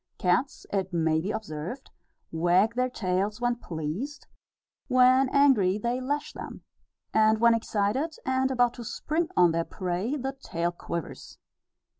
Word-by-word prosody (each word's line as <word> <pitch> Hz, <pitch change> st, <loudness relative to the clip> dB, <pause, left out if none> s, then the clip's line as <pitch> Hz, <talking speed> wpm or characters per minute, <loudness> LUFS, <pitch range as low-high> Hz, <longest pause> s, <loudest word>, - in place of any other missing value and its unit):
Cats, 185 Hz, +10 st, 0 dB
it 190 Hz, -2 st, -1 dB
may 160 Hz, -2 st, +1 dB
be 190 Hz, -, -4 dB
observed, 200 Hz, -, -5 dB, 0.4 s
wag 175 Hz, +7 st, +3 dB
their 250 Hz, +1 st, 0 dB
tails 200 Hz, -1 st, -1 dB
when 240 Hz, 0 st, 0 dB
pleased; 175 Hz, -, -5 dB, 0.6 s
when 255 Hz, 0 st, +5 dB
angry, 260 Hz, -10 st, +4 dB
they 240 Hz, +4 st, -2 dB
lash 285 Hz, +3 st, -2 dB
them; -, -, -9 dB, 0.5 s
and, 220 Hz, 0 st, +4 dB
when 235 Hz, 0 st, +5 dB
excited, 230 Hz, +7 st, -1 dB
and 260 Hz, 0 st, +1 dB
about 245 Hz, -2 st, +2 dB
to 240 Hz, -, -8 dB
spring 315 Hz, +8 st, -2 dB
on 175 Hz, -2 st, +6 dB
their 165 Hz, 0 st, 0 dB
prey, 185 Hz, -, -3 dB
the 270 Hz, -1 st, -3 dB
tail 170 Hz, +1 st, -2 dB
quivers. 170 Hz, -1 st, -7 dB
220 Hz, 140 wpm, -27 LUFS, 180-260 Hz, 0.6 s, on